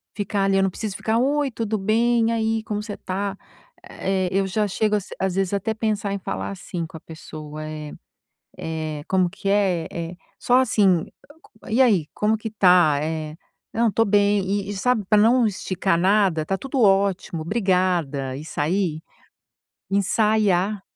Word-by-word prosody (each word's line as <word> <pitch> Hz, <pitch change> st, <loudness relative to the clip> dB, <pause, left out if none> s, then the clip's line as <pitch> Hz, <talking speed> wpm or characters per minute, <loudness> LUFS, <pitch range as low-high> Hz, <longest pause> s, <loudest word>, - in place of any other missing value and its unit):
ficar 205 Hz, -1 st, -1 dB
ali, 195 Hz, 0 st, +2 dB
eu 195 Hz, -, +3 dB
não 195 Hz, -, +2 dB
preciso 200 Hz, +1 st, -5 dB
ficar: 220 Hz, +1 st, 0 dB
"Oi, 285 Hz, +2 st, +1 dB
tudo 225 Hz, -2 st, -2 dB
bem? 225 Hz, +3 st, +2 dB
E -, -, +1 dB
aí, 225 Hz, -1 st, 0 dB
como 210 Hz, -1 st, -3 dB
você 210 Hz, -2 st, -6 dB
tá?" 195 Hz, +1 st, -3 dB, 0.5 s
eh, 190 Hz, -1 st, -2 dB
eu 195 Hz, +1 st, +1 dB
já 210 Hz, +2 st, 0 dB
chego 210 Hz, +2 st, 0 dB, 0.2 s
às 190 Hz, -1 st, 0 dB
vezes 195 Hz, 0 st, 0 dB
até 200 Hz, +3 st, -1 dB
pensar 210 Hz, -2 st, -1 dB
em 200 Hz, -, -3 dB
falar 195 Hz, +1 st, -4 dB
assim 180 Hz, -3 st, -5 dB
com 160 Hz, -, -10 dB
a -, -, -11 dB
pessoa, 155 Hz, -1 st, -9 dB
é 155 Hz, -1 st, -7 dB, 0.7 s
é, 155 Hz, -2 st, -4 dB
como 185 Hz, -2 st, +2 dB
que 200 Hz, +1 st, -5 dB
é, 195 Hz, -5 st, +1 dB
é, 170 Hz, +1 st, -5 dB, 0.2 s
só 245 Hz, -, +3 dB
assim: 200 Hz, -9 st, +3 dB, 0.6 s
"E 225 Hz, +4 st, +1 dB
aí, 220 Hz, -9 st, +4 dB
c -, -, -42 dB
como 215 Hz, +1 st, +1 dB
que 225 Hz, +1 st, -5 dB
tá?", 180 Hz, -7 st, +5 dB
é 155 Hz, 0 st, -4 dB, 0.4 s
"Não, 230 Hz, -1 st, +2 dB
tô 225 Hz, -, +3 dB
bem". 205 Hz, 0 st, +3 dB
E 200 Hz, +1 st, -2 dB
e -, -, -3 dB
sabe 225 Hz, 0 st, +1 dB
pra 215 Hz, -, +5 dB
não 235 Hz, +3 st, +5 dB
esticar 185 Hz, -4 st, -1 dB
nada? 190 Hz, -3 st, +2 dB
"Tá 195 Hz, +4 st, -1 dB
tudo 270 Hz, +3 st, -2 dB
ótimo, 195 Hz, -5 st, +2 dB
brigada!", 180 Hz, -, 0 dB
e 145 Hz, -, -7 dB
sair, 160 Hz, +1 st, -1 dB, 0.9 s
ensaiar 200 Hz, -1 st, +2 dB
195 Hz, 170 wpm, -23 LUFS, 175-215 Hz, 0.9 s, tá